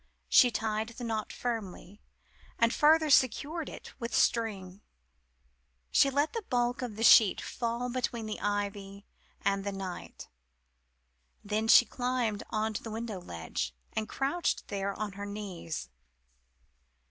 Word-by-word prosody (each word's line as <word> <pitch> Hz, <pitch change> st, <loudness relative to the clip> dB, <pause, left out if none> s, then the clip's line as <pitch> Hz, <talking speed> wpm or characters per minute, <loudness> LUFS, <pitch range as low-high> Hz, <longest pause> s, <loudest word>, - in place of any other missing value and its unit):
She 250 Hz, -, +7 dB
tied 220 Hz, -1 st, -2 dB
the 235 Hz, +1 st, -9 dB
knot 220 Hz, -2 st, -3 dB
firmly, 210 Hz, -4 st, -5 dB, 0.6 s
and 230 Hz, +1 st, +3 dB
further 310 Hz, 0 st, +4 dB
secured 285 Hz, +5 st, +2 dB
it -, -, -10 dB
with 235 Hz, -2 st, -3 dB
string. 200 Hz, -4 st, 0 dB, 1.1 s
She 275 Hz, -, +5 dB
let 285 Hz, +3 st, 0 dB
the 460 Hz, -, -1 dB
white 415 Hz, -, -16 dB
bulk 245 Hz, 0 st, 0 dB
of 240 Hz, -4 st, -4 dB
the 225 Hz, -, -3 dB
sheet 220 Hz, -3 st, +7 dB
fall 235 Hz, +1 st, -3 dB
between 240 Hz, -2 st, -2 dB
the 215 Hz, -, -4 dB
ivy 200 Hz, -1 st, -3 dB, 0.4 s
and 195 Hz, 0 st, +1 dB
the 200 Hz, -, -2 dB
night, 190 Hz, -2 st, -7 dB, 1.2 s
then 215 Hz, +2 st, -1 dB
she 240 Hz, -, +8 dB
climbed 245 Hz, -3 st, -1 dB
on 220 Hz, 0 st, -1 dB
to -, -, -4 dB
the 225 Hz, -, -7 dB
window 220 Hz, -2 st, -4 dB
ledge, 80 Hz, -, -5 dB, 0.2 s
and 215 Hz, 0 st, -2 dB
crouched 285 Hz, +6 st, -1 dB
there 200 Hz, -1 st, -2 dB
on 215 Hz, -1 st, -2 dB
her 200 Hz, +1 st, -7 dB
knees. 190 Hz, -, -6 dB
220 Hz, 140 wpm, -30 LUFS, 200-245 Hz, 1.2 s, she